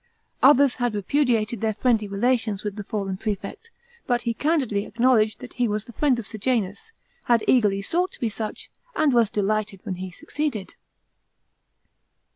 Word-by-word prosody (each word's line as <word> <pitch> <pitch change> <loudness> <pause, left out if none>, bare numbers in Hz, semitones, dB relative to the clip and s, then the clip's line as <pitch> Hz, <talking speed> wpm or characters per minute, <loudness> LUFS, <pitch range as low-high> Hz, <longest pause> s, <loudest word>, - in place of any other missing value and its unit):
Others 275 -1 +6
had 245 -3 0
repudiated 230 0 +1
their 220 -1 0
friendly 225 -2 +1
relations 215 0 0
with 205 -2 -3
the 210 - -5
fallen 195 -2 -3
prelect, 210 - -5 0.4
but 245 -1 +1
he 235 - 0
candidly 260 -8 0
acknowledged 230 -3 +2
that - - -9
"he 245 -1 +1
was 210 0 -2
the 235 - -12
friend 275 -2 +2
of 235 - -5
Sejanus, 220 - -2 0.3
had 235 -2 +3
eagerly 205 -5 +3
sought 350 - 0
to - - -11
be 235 - 0
such, 220 0 -5 0.2
and 305 -4 +3
was 235 -3 +4
delighted 210 -1 -1
when 195 -5 -4
he 185 +1 -5
succeeded." 285 - -4
225 Hz, 160 wpm, -24 LUFS, 205-255 Hz, 0.4 s, Others